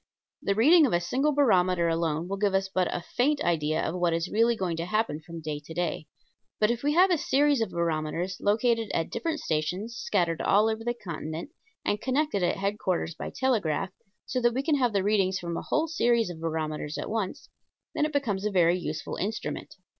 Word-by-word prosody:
The 200 - 0
reading 300 - +6
of 230 - -2
a 175 - +4
single 255 +13 +1
barometer 185 -11 +3
alone 165 0 0
will 195 +1 -3
give 200 -1 +1
us 195 0 +1
but 185 -1 0
a 175 - -3
faint 285 +4 +2
idea 155 -2 +1
of - - -2
what 175 -2 +1
is 165 0 -2
really 230 +2 +3
going 185 -5 -2
to 165 - -2
happen 215 -6 -1
from 165 0 -8
day 150 -1 -4
to 160 - -9
day. 170 -3 -2 0.5
But 215 +1 +3
if 240 0 -2
we 290 +1 +1
have 365 +3 +5
a 340 - +3
series 285 -2 +2
of 225 - 0
barometers 170 +2 -2
located 225 +1 +2
at 165 - -1
different 325 -2 -2
stations 180 +9 -2
scattered 175 -8 0
all 210 +2 +4
over 220 0 -3
the 240 +1 -1
continent 170 - -6 0.3
and 205 - 0
connected 270 -4 0
at 175 - +1
headquarters 195 -4 -1
by - - -6
telegraph, 195 - 0 0.3
so 255 - -2
that 240 0 +2
we 265 - 0
can 305 -1 +2
have 250 -3 +2
the 200 -2 +1
readings 195 -2 +2
from 170 -2 -4
a - - -3
whole 315 +2 0
series 235 - +2
of 160 -2 -10
barometers 155 -2 -3
at - - -4
once, 215 -4 -3 0.5
then - - 0
it 305 - 0
becomes 230 -10 -1
a 210 - +1
very 180 -2 +3
useful 155 -3 -4
instrument. 215 +4 -4
195 Hz, 210 wpm, -27 LUFS, 170-240 Hz, 0.5 s, reading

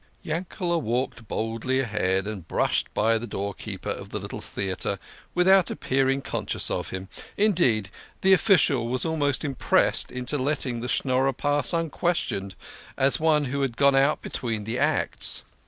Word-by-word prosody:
Yankele" 170 +1 -2
walked 120 -1 -2
boldly 115 +5 -1
ahead, 95 -6 0
and 100 -6 -6
brushed - - 0
by 115 +1 +3
the 120 - -6
door 100 -1 -3
keeper - - -6
of - - -6
the - - -4
little - - -6
theatre 95 0 -3 0.4
without 185 +1 +5
appearing 135 +1 0
conscious - - -2
of - - -2
him; 95 0 -6 0.3
indeed, 145 - +2 0.3
the 190 0 +5
official 160 - +4
was 125 +1 0
almost 150 -3 0
impressed 135 -3 +1
into 125 +3 -3
letting 130 -3 -1
the 125 - -3
Schnorrer 130 +1 +1
pass 145 0 0
unquestioned 165 - -1 0.4
as 135 +1 +3
one 155 -2 +3
who 140 +2 -2
had 130 -4 -1
gone 140 -1 +5
out 140 +3 +3
between 115 -4 -2
the 115 +4 -3
acts. - - 0
130 Hz, 155 wpm, -26 LUFS, 115-150 Hz, 0.4 s, without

